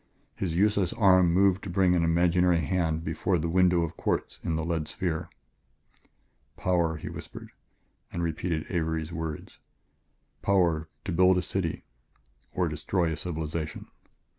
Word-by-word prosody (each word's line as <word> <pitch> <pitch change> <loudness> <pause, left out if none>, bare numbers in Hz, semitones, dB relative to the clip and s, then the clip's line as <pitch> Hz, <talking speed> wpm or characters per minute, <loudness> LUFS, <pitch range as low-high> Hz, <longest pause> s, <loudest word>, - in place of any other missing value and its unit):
His 85 -4 -2
useless 100 -1 +2
arm 95 -4 +5
moved 95 +1 +3
to 100 - -5
bring 90 0 +3
an 85 - +2
imaginary 85 +1 +3
hand 80 0 0
before 80 +3 0
the 85 - -2
window 90 0 +3
of 80 0 -4
quartz - - -2
in 80 - -1
the 80 0 -2
lead 80 -2 -1
sphere. 85 -1 -3 1.3
"Power," 85 -3 +1
he - - -8
whispered - - -9 0.6
and 85 - -3
repeated 80 0 -2
Avery's 80 -2 -2
words; 80 -2 -6 0.8
"power, 85 -5 +2 0.2
to 100 - -2
build 90 +2 +4
a 90 - 0
city 90 -4 -2 0.7
or 90 -1 0
destroy 80 +2 -1
a - - -2
civilization... 80 -2 -4
85 Hz, 140 wpm, -28 LUFS, 80-90 Hz, 1.3 s, arm